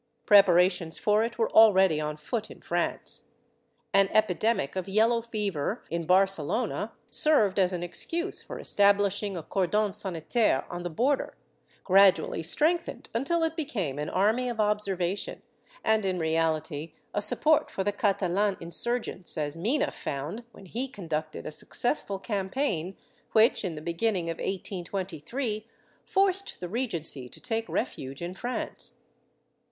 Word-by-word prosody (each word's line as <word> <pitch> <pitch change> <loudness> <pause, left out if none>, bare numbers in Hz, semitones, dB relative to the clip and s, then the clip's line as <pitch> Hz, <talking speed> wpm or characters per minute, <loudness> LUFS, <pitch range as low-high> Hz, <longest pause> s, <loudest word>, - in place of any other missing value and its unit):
^ - - -44
Preparations 180 -4 +5
for 210 +1 +2
it 230 +1 -4
were 225 - 0
already 190 -7 +6
on 150 0 -3
foot 215 +9 -4
in - - -12
France. - - -3 0.7
An 195 0 +5
epidemic 215 -5 +1
of 185 0 -3
yellow 225 +4 +3
fever 210 -4 -3
in 170 -1 -3
Barcelona 195 +4 +1 0.2
served 215 -11 +4
as 185 -1 +3
an 175 -1 -3
excuse 340 - -3
for - - -8
establishing 200 -1 +2
a 165 - -5
cordon 200 +4 0
sanitaire 190 - +1
on 175 0 -5
the 175 - -4
border, 255 - 0 0.5
grad 195 0 +7
ually 165 0 -5
strengthened 315 - +1
until 305 +9 0
it 325 0 0
became 205 - -3
an 150 - -3
army 220 +6 +1
of 235 -2 -5
observation 200 -3 -1 0.4
and 220 -1 +2
in 190 -1 0
reality 160 -1 -1 0.2
a 205 - 0
support 305 +8 +3
for 190 - -3
the 205 - +1
Catalan 200 -1 +1
insurgents, 185 +1 0
as 150 0 -1
Mina 230 - 0
found 150 - -5
when 195 - -14
he 240 +9 -3
conducted 160 - -5
a - - -5
successful 200 - -1
campaign 195 - -2 0.4
which 225 +1 +4
in 180 -5 -3
the 150 - -7
beginning 170 0 -1
of 165 - -6
1823 195 - -4 0.4
forced 390 0 +1
the 180 - -5
Regency 170 - -3
to - - -12
take 225 -2 -3
refuge 140 - -4
in 175 +1 -4
France. 245 +6 -5
195 Hz, 145 wpm, -28 LUFS, 170-225 Hz, 0.7 s, grad